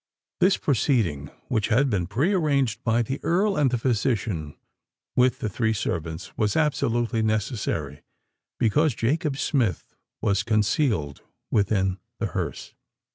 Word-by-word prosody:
This 185 +1 +4
proceeding, 105 - +1 0.2
which 110 -4 0
had 125 +5 +3
been 90 -5 0
pre 135 - +1
arranged 140 - +1
by 115 +1 +2
the 135 +5 -4
Earl 195 +4 +2
and 145 -6 +3
the 125 - 0
physician 110 - -1 0.6
with 125 0 +3
the 110 - -3
three 110 +2 0
servants, 85 -4 -4
was 105 -2 0
absolutely 120 -6 +1
necessary: 110 +1 -2 0.6
because 145 +5 +2
Jacob 140 +5 0
Smith 120 - -1 0.3
was 100 -1 +1
concealed 105 - 0 0.3
within 95 -2 +1 0.2
the - - -2
hearse! - - -4
115 Hz, 130 wpm, -25 LUFS, 100-135 Hz, 0.6 s, This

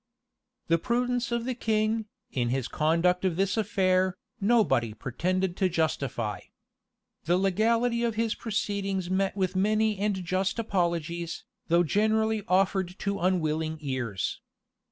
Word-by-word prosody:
The 165 0 +3
prudence 245 +4 0
of 235 0 -1
the 255 - -1
king, 220 -1 0 0.2
in 120 -2 0
his 130 0 -1
conduct 170 +4 +2
of 185 -3 +1
this 195 +2 +1
affair, 190 -4 +1 0.2
nobody 195 - +2
pretended 175 - -1
to 190 - +2
justify. 135 - -1 0.9
The 175 +2 +3
legality 230 +5 +2
of 230 -2 0
his 225 0 +1
proceedings 195 -4 -2
met 195 +1 0
with 185 -1 0
many 215 +1 +2
and 200 -2 0
just 190 +3 0
apologies, 170 -5 -1 0.2
though 170 +1 +4
generally 220 +5 +1
offered 190 0 +1
to 200 0 -2
unwilling 160 -3 0
ears. 130 -9 -3
190 Hz, 130 wpm, -28 LUFS, 170-215 Hz, 0.9 s, though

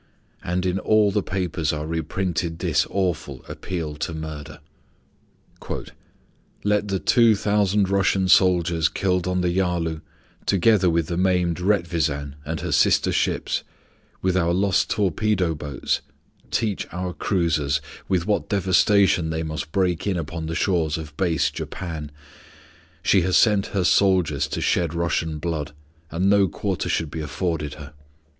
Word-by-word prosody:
And 90 +1 -1
in 90 +1 0
all 105 -1 +3
the 105 - +1
papers 90 -5 -2
are 75 0 -3
reprinted 80 +1 -2
this 80 -4 +1
awful 95 -3 -2
appeal 80 -5 -5
to 80 +2 -3
murder: 80 -2 -7 2.0
"Let 105 0 +1
the 100 -1 0
two 115 +3 +4
thousand 100 -1 +2
Russian 95 -1 +2
soldiers 85 -3 +4
killed 90 -2 0
on 90 0 0
the 90 -1 +1
Yalu, 85 -4 0 0.5
together 95 -1 +4
with 85 -1 +1
the 85 +2 -3
maimed 90 -2 +1
Retvisan 85 -7 0
and 80 +1 -4
her - - -3
sister - - +3
ships, - - 0 0.6
with 95 -1 +1
our 85 -2 +2
lost 95 0 +2
torpedo 95 -2 +1
boats, 75 -2 -2 0.5
teach 105 -4 -1
our 90 0 -4
cruisers 75 -8 0 0.3
with 90 -3 0
what 105 0 0
devastation 95 -2 +3
they 80 0 -2
must 80 -1 -5
break 90 -1 0
in 95 -3 0
upon 80 0 -4
the 80 - -3
shores 80 -5 +1
of 75 -2 -8
base 80 -7 +1
Japan. 80 -5 -6 0.9
She 95 - +4
has 90 +1 +2
sent 105 -4 +3
her 95 -2 -1
soldiers 90 -8 +3
to - - -4
shed 85 -2 +1
Russian 85 -2 -1
blood, 75 -2 -3 0.4
and 90 +4 0
no 100 -1 +5
quarter 95 +1 -3
should 80 -2 -1
be 80 - -4
afforded 75 -1 -3
her. 75 -1 -11
90 Hz, 145 wpm, -23 LUFS, 80-95 Hz, 2.0 s, no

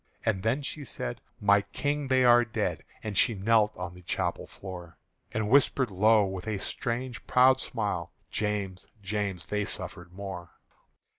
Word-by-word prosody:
And 100 -5 +1
then 125 +7 0
she 145 +1 -3
said, 60 - -4 0.2
"My 100 0 +5
King, 145 +6 -2
they 130 -1 +4
are 120 0 +7
dead!" 110 -1 -2 0.2
And 105 -2 -4
she 115 - +5
knelt 110 +2 +3
on 90 -1 -5
the 90 - -13
chapel 85 - -2
floor, 90 -3 -9 0.3
And 110 -1 -1
whispered 130 -1 +3
low 105 +2 +5
with 95 +1 -5
a 110 -2 -1
strange 120 +5 -4
proud 130 +1 +5
smile, 105 -10 -3 0.2
"James, 100 -3 -2 0.2
James, 100 -2 -2
they 105 0 -1
suffered 90 -3 -4
more!" 90 -2 -7
105 Hz, 155 wpm, -29 LUFS, 95-120 Hz, 0.3 s, are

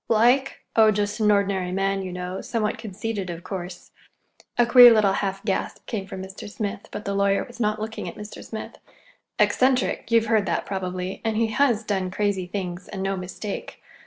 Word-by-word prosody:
"Like? 245 +5 +3
Oh, 220 -1 +7
just 205 +1 0
an 215 -1 +3
ordinary 200 -3 +1
man, 195 +1 0
you 185 -1 -5
know,—somewhat 190 +5 -3
conceited, 210 -2 -4
of 170 0 -6
course." 180 -2 -7 0.7
(A 240 - +5
queer 245 0 +10
little 210 -3 +4
half 195 0 -2
gasp 195 - -2
came 200 -5 -4
from 190 -2 -6
Mr. 190 +2 -9
Smith, 205 -1 -5
but 210 - -6
the 200 - -1
lawyer 200 0 +2
was 240 - -13
not 215 -1 0
looking 220 +1 -5
at - - -10
Mr. 210 0 -9
Smith.) 220 - -8 0.6
"Eccentric—you've 250 -3 +2
heard 220 -3 +2
that, 170 - -1
probably. 185 -1 -4
And 225 -1 0
he 225 0 +2
has 235 -1 +2
done 190 -3 -1
crazy 195 -1 -1
things, 180 -1 -5
and 190 -2 -5
no 195 0 0
mistake. 190 +2 -6
205 Hz, 180 wpm, -24 LUFS, 190-220 Hz, 0.7 s, queer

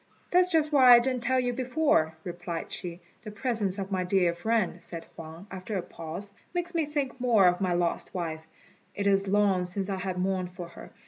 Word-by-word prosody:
"That's 360 0 +5
just 315 -2 +2
why 255 -4 +8
I - - +7
didn't 255 0 -1
tell 260 +2 +2
you 245 -1 0
before," 255 - +1
replied 175 -1 -5
she. 175 0 -5 0.2
"The 215 - -6
presence 210 -3 -1
of 195 0 -5
my 185 -1 0
dear 180 -2 +2
friend," 215 +2 0
said 165 -1 -7
Huang, 165 +3 -9
after 190 +2 -4
a 180 - -2
pause, 170 +5 -7 0.2
"makes 350 0 -2
me 325 -3 0
think 280 -4 -3
more 230 -6 +5
of 180 +2 +2
my 185 -2 +1
lost 175 -1 -1
wife. 165 -3 -4 0.5
It 200 - -2
is 195 0 +3
long 200 -2 +3
since 190 +2 -2
I 190 - -1
have 185 -1 -3
mourned 185 -1 -1
for 180 -1 -8
her. 170 - -12
195 Hz, 205 wpm, -28 LUFS, 180-245 Hz, 0.5 s, why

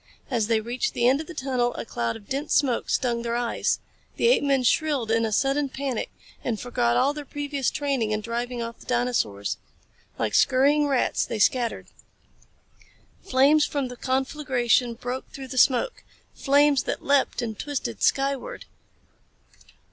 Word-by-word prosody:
As 225 -4 +1
they 225 -1 +2
reached 245 - -2
the 240 - +3
end 270 +4 +3
of 320 - -10
the 350 - -9
tunnel 255 -3 -1
a - - -5
cloud 115 - -2
of 205 - -12
dense 280 +3 -1
smoke 260 -5 +1
stung 240 -3 0
their 235 0 -2
eyes. 240 -1 0 0.4
The 465 - +3
apemen 280 - +2
shrilled 265 -3 +1
in 225 0 +2
a 220 - -2
sudden 275 +5 +1
panic 265 -3 -3 0.3
and 225 -4 -2
forgot 120 - 0
all 280 - +3
their 295 0 -6
previous 285 -2 -2
training 275 -7 -1
in 215 0 -1
driving 235 +2 -3
off 230 0 -7
the - - -16
dinosaurs. 240 - -1 0.6
Like 110 -2 -1
scurrying 280 - +4
rats 270 -3 +1
they 225 - -4
scattered. 235 +2 +1 1.4
Flames 290 0 +4
from 280 -3 -2
the 250 - -8
conflagration 260 -3 0
broke 250 +2 -5
through 265 -1 -8
the 255 0 -1
smoke 270 - +2 0.3
flames 285 0 +3
that - - -4
leaped 280 -3 +2
and 220 -3 -5
twisted 185 - -4
skyward. 275 - 0
255 Hz, 160 wpm, -25 LUFS, 235-280 Hz, 1.4 s, scurrying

